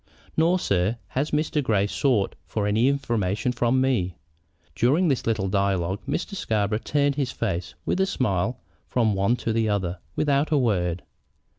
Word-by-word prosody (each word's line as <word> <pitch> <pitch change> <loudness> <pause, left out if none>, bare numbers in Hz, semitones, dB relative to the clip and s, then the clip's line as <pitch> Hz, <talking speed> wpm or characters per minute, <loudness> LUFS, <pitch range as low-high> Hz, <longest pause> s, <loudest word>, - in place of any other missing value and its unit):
"Nor, 170 +3 +3
sir, 100 - 0
has 140 +4 -1
Mr. 150 0 0
Grey 105 -7 +2
sought 110 -1 +1
for 105 -2 -2
any 110 +4 +3
information 120 -5 0
from 125 +1 +1
me." 120 -10 +1 0.6
During 155 +9 +3
this 135 -5 0
little 110 -4 +1
dialogue 95 -1 0
Mr. 175 +7 -2
Scarborough 105 - 0
turned 145 +3 +1
his 135 -3 0
face, 95 -7 -3
with - - 0
a 190 - +3
smile, 120 - 0 0.3
from 115 -4 +2
one 100 +5 +2
to 115 -2 -2
the 110 -1 +1
other, 95 -3 -1 0.2
without 145 0 +2
a 150 - +3
word. 90 -9 0
115 Hz, 160 wpm, -25 LUFS, 100-140 Hz, 0.6 s, Nor